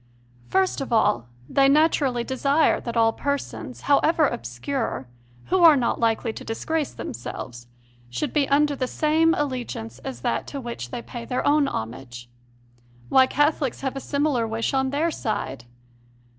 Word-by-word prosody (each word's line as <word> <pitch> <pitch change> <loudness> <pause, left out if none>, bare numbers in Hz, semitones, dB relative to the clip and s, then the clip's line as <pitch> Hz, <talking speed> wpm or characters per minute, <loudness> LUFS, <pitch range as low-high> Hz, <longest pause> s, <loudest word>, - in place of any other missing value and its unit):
First 380 -5 +1
of 270 - -5
all, 120 - +2 0.2
they 275 0 +4
naturally 280 -5 +3
desire 275 +5 +2
that 235 -1 -4
all 225 0 +4
persons, 280 -2 -4
however 310 +2 +3
obscure, 125 - -3 0.4
who 375 - +3
are 325 -3 +9
not 245 -4 0
likely 225 0 +1
to - - -8
disgrace 300 +6 -2
themselves, 120 +1 -7 0.4
should 120 0 -3
be 290 -3 +2
under 290 +1 +3
the 255 -2 -2
same 320 +4 +2
allegiance 245 - -4
as 125 -2 -7
that 115 - -1
to 280 - -5
which 235 - -6
they 235 - -5
pay 240 -2 -7
their 250 +1 -2
own 290 0 +4
homage. 120 - -6 0.8
Why, 260 0 +6
Cath 295 +3 +2
olics 270 -6 -3
have 270 0 -2
a - - -3
similar 280 -4 0
wish 225 +4 -2
on 265 0 +1
their 305 +5 0
side! 135 - -3
260 Hz, 155 wpm, -24 LUFS, 220-290 Hz, 0.8 s, are